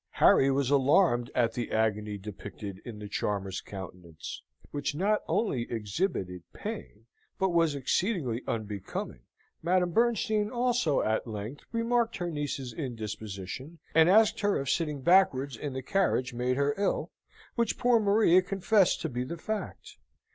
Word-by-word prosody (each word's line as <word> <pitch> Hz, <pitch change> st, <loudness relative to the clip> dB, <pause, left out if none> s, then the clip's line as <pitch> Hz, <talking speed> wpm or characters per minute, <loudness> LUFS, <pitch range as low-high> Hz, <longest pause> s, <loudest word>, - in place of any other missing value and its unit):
Harry 135 Hz, -, +5 dB
was 135 Hz, 0 st, +1 dB
alarmed 135 Hz, -3 st, +4 dB
at 115 Hz, -2 st, +2 dB
the 120 Hz, 0 st, -4 dB
agony 105 Hz, -1 st, 0 dB
depicted 100 Hz, -1 st, -8 dB
in 115 Hz, -3 st, -8 dB
the 105 Hz, 0 st, -7 dB
charmer's 100 Hz, -2 st, -2 dB
countenance; 90 Hz, -4 st, -8 dB, 0.3 s
which 145 Hz, 0 st, -2 dB
not 205 Hz, +6 st, +1 dB
only 135 Hz, -, 0 dB
exhibited 105 Hz, -, -2 dB
pain, 205 Hz, -, -7 dB, 0.3 s
but 190 Hz, -, +1 dB
was 165 Hz, -4 st, +2 dB
exceedingly 140 Hz, -, 0 dB
unbecoming. 105 Hz, -, -4 dB, 0.4 s
Madame 180 Hz, +1 st, +2 dB
Bernstein 220 Hz, 0 st, +2 dB
also 245 Hz, -, +1 dB
at 110 Hz, +2 st, 0 dB
length 110 Hz, +5 st, -6 dB
remarked 235 Hz, 0 st, +1 dB
her 175 Hz, -1 st, -3 dB
niece's 145 Hz, -5 st, -3 dB
indisposition, 110 Hz, -, -6 dB, 0.2 s
and 160 Hz, +1 st, +6 dB
asked 215 Hz, +2 st, +5 dB
her 205 Hz, -1 st, +1 dB
if 135 Hz, -1 st, -1 dB
sitting 150 Hz, -4 st, -1 dB
backwards 140 Hz, -6 st, +4 dB
in 140 Hz, +4 st, -5 dB
the 130 Hz, 0 st, -4 dB
carriage 130 Hz, -7 st, +1 dB
made 125 Hz, +1 st, 0 dB
her 140 Hz, 0 st, +2 dB
ill, 200 Hz, -, 0 dB, 0.4 s
which 235 Hz, -2 st, 0 dB
poor 245 Hz, -1 st, +4 dB
Maria 200 Hz, -3 st, +5 dB
confessed 195 Hz, +1 st, +2 dB
to -, -, -1 dB
be 125 Hz, -3 st, -3 dB
the 170 Hz, +7 st, -6 dB
fact. 215 Hz, +3 st, -5 dB
140 Hz, 145 wpm, -29 LUFS, -, 0.4 s, and